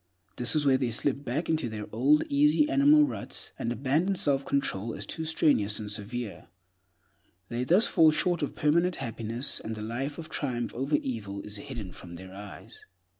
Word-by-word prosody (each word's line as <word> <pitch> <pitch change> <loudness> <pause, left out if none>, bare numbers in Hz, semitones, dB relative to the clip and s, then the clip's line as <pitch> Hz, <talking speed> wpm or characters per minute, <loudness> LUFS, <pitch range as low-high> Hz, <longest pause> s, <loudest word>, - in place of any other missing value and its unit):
This 120 +2 +2
is 150 -1 +2
where 130 -2 +4
they 125 -3 0
slip 135 +4 0
back 145 +6 -2
into 160 -7 0
their 105 -1 -5
old, 135 +7 +3
easy, 295 +1 +3
animal 300 0 +5
ruts, - - -6
and 115 - -2
abandon 145 - +1
self 140 -5 +2
control 115 -6 -1
as - - -5
too 160 - -4
strenuous 115 -10 +2
and 105 -2 -5
severe. 105 +1 -5 1.0
Thus 120 +2 -2
they 180 +5 +5
fall 160 -1 +6
short 170 +3 +1
of 145 - -3
permanent 170 +4 +2
happiness, 115 0 -2
and 110 - -5
the 105 - -6
life 130 +6 -4
of 165 -2 -7
triumph 120 -5 -3
over 135 +4 0
evil 105 -6 -4
is 105 0 -8
hidden 115 -7 -7
from 85 -1 -11
their 95 +2 -10
eyes. 100 0 -10
130 Hz, 180 wpm, -28 LUFS, 110-155 Hz, 1.0 s, fall